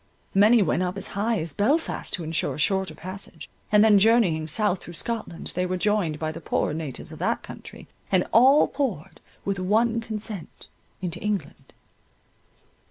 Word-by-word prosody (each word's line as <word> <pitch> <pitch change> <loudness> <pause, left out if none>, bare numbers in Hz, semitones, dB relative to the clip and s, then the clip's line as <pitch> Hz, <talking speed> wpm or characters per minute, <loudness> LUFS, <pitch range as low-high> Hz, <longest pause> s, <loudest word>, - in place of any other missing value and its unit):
Many 210 +3 +6
went 175 0 0
up 180 +1 -2
as 195 - -6
high 215 +3 0
as 160 -2 -3
Belfast 285 - 0
to 175 - -1
ensure 160 +1 -1
a - - -8
shorter 190 +5 0
passage, 185 +3 -7 0.2
and 210 0 +6
then 210 -2 +6
journeying 195 -8 +3
south 195 +3 0
through 175 - -10
Scotland, 225 -4 -3
they 180 - 0
were 185 0 -1
joined 190 -5 0
by 155 0 -3
the 165 +1 -9
poorer 150 - -1
natives 155 -4 -6
of - - -10
that - - -1
country, - - -11 0.2
and 185 -2 +3
all 265 +6 +6
poured 225 - -4 0.2
with 195 -1 -1
one 225 +5 +2
consent 215 -5 -6 0.3
into 175 -3 -3
England. 210 -2 -4
195 Hz, 165 wpm, -25 LUFS, 170-220 Hz, 0.3 s, Many